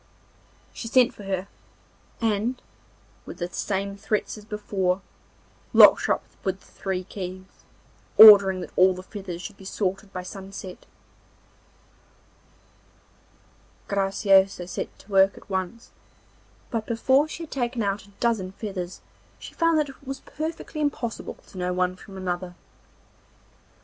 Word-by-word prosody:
She 230 - -6
sent 250 +1 +4
for 205 - -11
her, 190 0 -2 0.7
and 225 +3 0 0.7
with - - -8
the 175 - -3
same 200 0 -2
threats 210 +1 -2
as 210 -1 -12
before 195 -3 -1 0.7
locked - - +8
her - - +4
up - - -11 0.2
with 190 0 -1
the - - -21
three 190 -2 -3
keys, 185 0 -7 0.7
ordering 200 -4 +10
that - - -8
all 185 0 +5
the 185 - -8
feathers 185 -3 -7
should 210 - -8
be - - -14
sorted 195 +1 -3
by 185 -1 -5
sunset. 190 -1 -9 3.0
Graciosa 195 -1 +3
set 180 - -5
to 205 - -17
work 195 0 +4
at - - -14
once, 190 +5 -4 0.8
but 225 -2 -2
before 260 +5 +3
she 330 +1 -7
had 320 - -10
taken 245 -3 -1
out 200 0 -2
a - - -19
dozen 215 -6 0
feathers 190 -4 -6 0.4
she - - -11
found 330 -1 +2
that 300 -2 +1
it 270 - -14
was 270 0 -5
perfectly 315 0 -5
impossible 270 -6 -3
to 185 - -11
know 180 0 -1
one 180 0 0
from 195 +1 -12
another. 180 -1 -4
195 Hz, 140 wpm, -25 LUFS, 185-225 Hz, 3.0 s, ordering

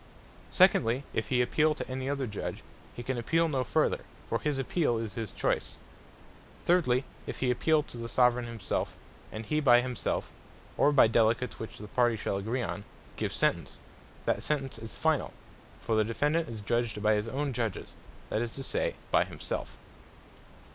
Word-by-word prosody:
Secondly, 120 +5 +4
if 110 -2 -1
he 125 +1 +3
appeale 155 +3 +2
to - - -5
any 130 +1 -3
other 140 -1 -1
Judge, 105 -4 -5 0.3
he 120 - -6
can 130 0 -2
appeale 165 +7 +2
no 135 -5 0
further; - - +1 0.3
for 115 - 0
his 150 -2 -1
appeale 135 -1 +1
is 110 -3 -4
his 110 -2 -4
choice. - - -1 0.9
Thirdly, 140 -8 +3 0.2
if - - -5
he 125 -1 +3
appeale 155 +4 +3
to - - -10
the 115 0 -4
Soveraign 125 -1 +3
himself, 115 -5 -3 0.3
and 110 +1 -6
he 150 +7 +1
by 125 -5 +6
himself, 125 -1 -2 0.4
or 145 - +4
by 145 - +7
Delegates 115 +2 +2
which 110 - -7
the 105 - -8
parties 120 -2 +2
shall 100 - -1
agree 115 +6 -1
on, 105 - -4 0.3
give - - -2
Sentence; - - 0 0.5
that - - +1
Sentence 135 -5 -2
is 115 0 -8
finall: 160 -3 +1 0.5
for 115 - -2
the 110 - +4
Defendant 150 +9 0
is 110 -2 -6
Judged 110 0 -1
by 110 0 +5
his 105 +1 0
own 140 +3 -2
Judges, 115 -5 -2 0.4
that 110 - 0
is 120 - -1
to 135 - -5
say, - - -1 0.2
by - - +5
himself. - - -5
120 Hz, 175 wpm, -30 LUFS, 115-140 Hz, 0.9 s, by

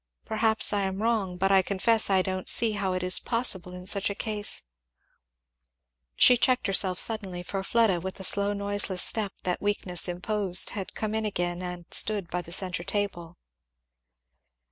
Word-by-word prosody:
Perhaps 220 0 +2
I 205 - 0
am 190 0 -3
wrong, 215 -5 -1
but 195 +2 0
I 195 -1 +5
confess 210 +4 +2
I 190 -1 +2
don't 185 0 -2
see 230 -2 +5
how 200 -3 -2
it 185 0 -3
is 180 0 +3
possible 190 -7 +1
in 180 0 -10
such 200 +1 +1
a 200 - -5
case" 210 -1 0 1.5
She 250 - +5
checked 250 -2 +1
herself 190 -2 +1
suddenly, 195 -6 -1
for 195 +2 -4
Fleda 210 -3 +1
with 190 +1 -6
the 190 - -9
slow 200 +2 +2
noiseless 200 -2 0
step 210 -3 -1
that 180 -1 -3
weakness 195 -4 -2
imposed 185 +1 0
had 195 -4 -7
come 215 -1 -4
in 220 0 -1
again 175 -4 -3
and 180 -1 -7
stood 205 -5 +1
by 180 - -2
the 170 - -12
centre 180 -1 +1
table. 180 -4 -4
195 Hz, 170 wpm, -26 LUFS, 180-210 Hz, 1.5 s, I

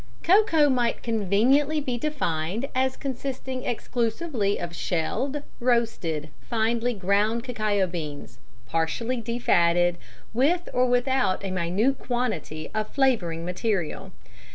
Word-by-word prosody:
Cocoa 350 -5 +5
might 245 -4 +1
conveniently 235 +8 +2
be 260 -4 -2
defined 230 - -2
as 260 0 +1
consisting 260 -1 -4
exclusively 230 -2 -1
of 170 -1 -5
shelled, 265 - -1 0.2
roasted, 225 -11 0
finely 235 +1 0
ground 205 +4 +1
cacao 215 -6 0
beans, 150 -8 -6 0.3
partially 165 - -1
de 235 +1 -3
fatted, 175 -5 +3 0.3
with 320 +9 +2
or 250 0 +3
without 245 -5 +1
a 190 - -2
minute 185 +9 +1
quantity 215 - -3
of 215 -1 -2
flavouring 185 -12 +1
material. 180 -2 -2
230 Hz, 110 wpm, -26 LUFS, 180-260 Hz, 0.3 s, Cocoa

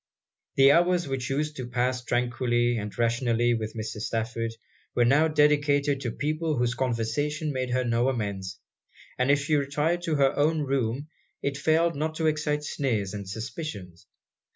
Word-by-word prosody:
The 135 0 +7
hours 175 +1 +3
which 135 -2 -3
used 150 +2 -1
to 130 -2 -5
pass 125 +1 -1
tranquilly 120 0 +1
and 105 -2 -5
rationally 120 0 +2
with 110 -1 -3
Mrs. 110 -1 -5
Stafford, 115 +1 -2 0.4
were 120 - +4
now 145 +6 +4
dedicated 145 -2 +2
to 120 - -2
people 155 +3 -1
whose 120 0 +1
conversation 135 +6 -1
made 130 -1 -2
her 130 +1 +1
no 120 +1 +1
amends; 100 -6 -3 0.6
and 125 +1 +2
if 145 0 +4
she 150 +2 -1
retired 150 +5 0
to 160 - 0
her 135 -2 +3
own 155 +2 +2
room, 135 +1 -1 0.3
it 140 0 -1
failed 160 +4 +2
not 155 +2 -2
to 160 - -1
excite 150 -1 0
sneers 110 -10 -1
and 100 -2 -6
suspicions. 100 - -7
130 Hz, 160 wpm, -27 LUFS, 115-150 Hz, 0.6 s, The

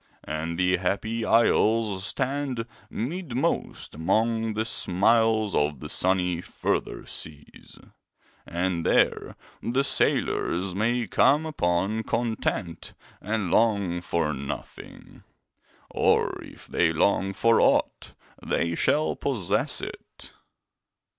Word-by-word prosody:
And 80 +2 -4
the 90 0 +2
Happy 105 +5 -2
Isles 110 -3 +3
stand 130 +1 -2 0.2
midmost 135 - -2
among 110 +7 0
the 110 +1 -1
smiles 110 +1 +2
of 75 -2 0
the 75 - -8
sunny 90 -1 +1
Further - - -3
Seas, 75 -2 -6 0.7
and 85 -1 -2
there - - +1 0.3
the 130 +4 0
sailors 95 -8 +1
may 115 +5 0
come 145 - +3
upon 100 - 0
content 110 -7 -3 0.3
and 105 -4 -2
long 100 -6 +2
for 85 -3 -1
nothing; 70 0 -8 0.7
or - - +2
if - - -12
they 85 -2 +1
long 95 +4 +1
for 115 +3 +3
aught, - - +1 0.3
they 85 0 0
shall 150 - +1
possess 115 -11 0
it. - - -9
100 Hz, 100 wpm, -26 LUFS, 85-115 Hz, 0.7 s, Isles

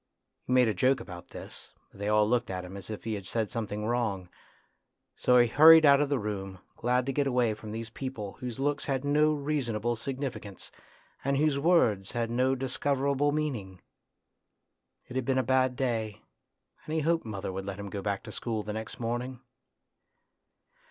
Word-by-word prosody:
He 125 - 0
made 125 -2 +5
a 110 - +1
joke 130 +8 +2
about 90 -2 -9
this, - - -10 0.2
but - - -17
they 100 +1 -1
all 105 0 +4
looked 120 0 +1
at 90 -1 -4
him 90 +2 -9
as 100 +1 -8
if 110 - -6
he 110 - -2
had 100 -3 -5
said 110 -3 -1
something 105 -2 -3
wrong, 110 -6 -1 0.9
so 125 - +4
he 120 - +7
hurried 160 +6 +8
out 140 0 +7
of 145 - +1
the 140 - +1
room, 95 -3 -4 0.2
glad 125 +1 +1
to 135 - -2
get 140 +1 +1
away 125 -4 +2
from 105 0 -9
these 110 0 -5
people 115 -7 -5
whose 125 -3 -5
looks 145 +1 0
had 135 -1 -1
no 150 +2 +4
reasonable 130 -6 -1
signifi 135 +3 -4
cance, 100 -3 -10 0.5
and 140 0 +1
whose 145 -1 +2
words 120 - +2
had 115 -1 -1
no 130 +2 +2
discoverable 140 +2 0
meaning. 125 -12 -3 1.3
It 125 - -10
had 130 - 0
been 130 +1 +1
a 130 - +3
bad 130 -1 +2
day, 115 -5 -2 0.6
and 155 - -3
he 160 - +1
hoped 165 +2 +1
mother 100 -4 -5
would 95 +1 -5
let 100 -1 -4
him 100 -1 -6
go 100 - -4
back 100 -1 -2
to 110 - -9
school 110 -1 -3
the 105 - -5
next 110 +1 -6
morning. 120 +2 -3
120 Hz, 190 wpm, -29 LUFS, 105-135 Hz, 1.3 s, hurried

